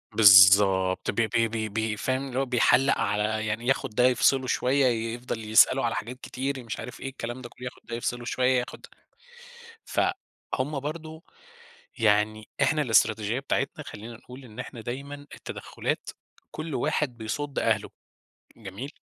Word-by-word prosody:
بالضبط، 95 -2 +6
ب - - -12
ب 115 - 0
ب 110 -2 0
ب 110 -1 -1
فاهم، 130 +5 -2
اللي 130 0 -3
هو 135 - +1
بيحلَق 130 +2 +3
على 110 +1 -1
يعني 110 +3 -3
ياخُد 135 0 +1
ده 125 - +3
يفصّله 130 +1 +3
شوية، 135 +2 +2
ي 115 -2 0
يفضَل 120 -2 -5
يسأله 120 +4 +5
على 115 - -1
حاجات 125 +3 -5
كتير، 135 0 -4
مش 115 - -6
عارف - - -8
إيه، 135 - -5
الكلام 120 -1 -6
ده 120 - -9
كلّه، 125 - -11
ياخد 125 - -8
ده 115 - -5
يفصّله 120 +1 -3
شوية، 125 +1 +2
ياخد 125 - -7
ده. - - -14 1.0
فهُم 140 +2 -3
برضه، 160 +2 -7 0.8
يعني 110 0 +1
إحنا 150 +3 +2
الاستراتيجية 110 -1 +2
بتاعتنا 135 - -2
خلّينا 115 +3 -9
نقول 125 +3 -13
إن 110 -3 -14
إحنا 120 - -7
دايمًا 135 +5 -6 0.2
التدخلات - - -5 0.4
كلّ 155 -1 -6
واحد 125 +1 -1
بيصُد 135 +6 -4
أهله، - - 0 0.7
جميل. 110 +5 -8
120 Hz, 160 wpm, -26 LUFS, 110-135 Hz, 1.0 s, بالضبط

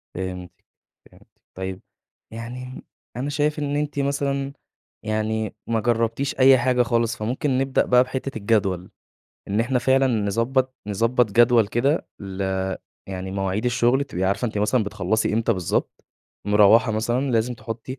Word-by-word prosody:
فهمتِك، 90 -1 -5 0.6
فهمتِ. - - -21 0.3
طيب 95 0 -5 0.5
يعني 125 +3 -7 0.3
أنا 140 +3 -2
شايف 150 +1 0
إن 145 -1 -2
أنتِ 145 -1 -2
مثلًا 140 0 -1 0.5
يعني 110 0 -1
ما 115 -1 +1
جربتيش 115 +4 -1
أي 130 0 +7
حاجة 125 0 +2
خالص، 115 0 0
فممكن 130 +5 -1
نبدأ 135 0 +1
بقى 125 0 +5
بحتة 130 -1 -5
الجدول، 100 -4 0 0.6
إن 105 +3 +1
إحنا 125 +2 +1
فعلًا 135 +2 +3
نضبط 120 +4 0
نضبط 115 +2 +1
جدول 120 -1 +5
كده 135 +8 0
ل 95 -1 -5 0.7
يعني 95 0 -5
مواعيد 95 +2 -2
الشغل، 125 +3 +2
تبقي 95 -8 -3
عارفة 100 +6 0
إن 120 - +1
أنتِ 105 - -4
مثلًا 105 +3 +2
بتخلصي 100 +2 -1
إمتى 115 +1 +2
بالضبط، 90 -5 -2 0.4
مروّحة 105 +3 +5
مثلًا 120 +5 0
لازم 120 +1 +1
تحطي 115 +4 -7
115 Hz, 145 wpm, -23 LUFS, 105-130 Hz, 0.7 s, أي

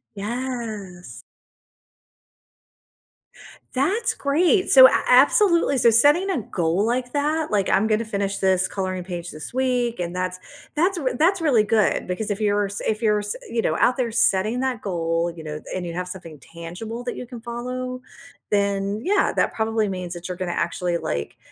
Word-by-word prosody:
Yes. 215 -5 -6 2.5
That's 400 - 0
great! 345 +7 +2
So 260 -1 +10
a - - +1
absolutely, 290 +3 +4
so 235 -1 +5
setting 295 - +4
a 270 - -1
goal 175 0 -1
like 245 +2 -2
that, 300 +2 0
like, 200 -2 +1
"I'm 195 +3 +3
gonna 220 +1 +1
finish 200 -2 -3
this 190 -1 +2
coloring 185 -2 -3
page 175 -1 -6
this 155 +9 -9
week," 250 -3 0
and 175 0 -3
that's 185 0 -3 0.3
that's 355 +5 +1
r 270 -6 -1
that's 360 +7 +2
really 285 -9 +3
good 215 -2 +1
because 205 +3 -3
if 205 - -3
you're 205 -1 +2
s 200 +1 -6
if 220 +1 -1
you're 210 -1 +3
s 205 0 -4
you 230 - -1
know, - - 0
out 250 - +3
there 245 -3 -1
setting 220 +1 +1
that 260 -4 -2
goal, 170 -2 -1
you 160 - -9
know? 150 0 -6
And, 185 -1 -3
you 170 - -5
have 180 +1 -4
something 170 -5 -9
tangible 175 - -8
that 245 - -4
you 250 - -7
can 240 -2 -9
follow, 250 +2 -5 0.5
then 200 +1 0
yeah, 390 +4 +2
that - - +1
probably 220 -1 0
means 185 -2 -5
that 175 0 -7
you're 180 -1 -5
gonna 185 -1 -3
actually, 170 +1 -1
like, 70 - -4
215 Hz, 175 wpm, -23 LUFS, 185-255 Hz, 2.5 s, So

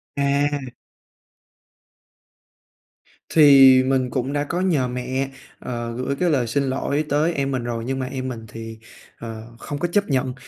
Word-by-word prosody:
À! 140 -1 0 2.6
Thì 135 -4 +8
mình 130 -1 0
cũng 130 +2 -2
đã 145 0 0
có 170 +5 -3
nhờ 155 -9 +1
mẹ, 125 +2 -3 0.3
ờ, 120 -2 -5
gửi 130 +2 -2
cái 175 +5 0
lời 130 -6 +1
xin 140 +5 0
lỗi 140 +3 -1
tới 150 +4 +1
em 140 -2 -1
mình 130 -2 -2
rồi 120 -1 -3
nhưng 135 +1 -2
mà 130 - -2
em 130 0 -5
mình 115 -3 -6
thì, 115 0 -9 0.4
ờ, 115 -1 -7 0.2
không 145 -1 -6
có 175 - 0
chấp 200 +2 0
nhận. 130 -2 0
135 Hz, 160 wpm, -22 LUFS, 125-145 Hz, 2.6 s, Thì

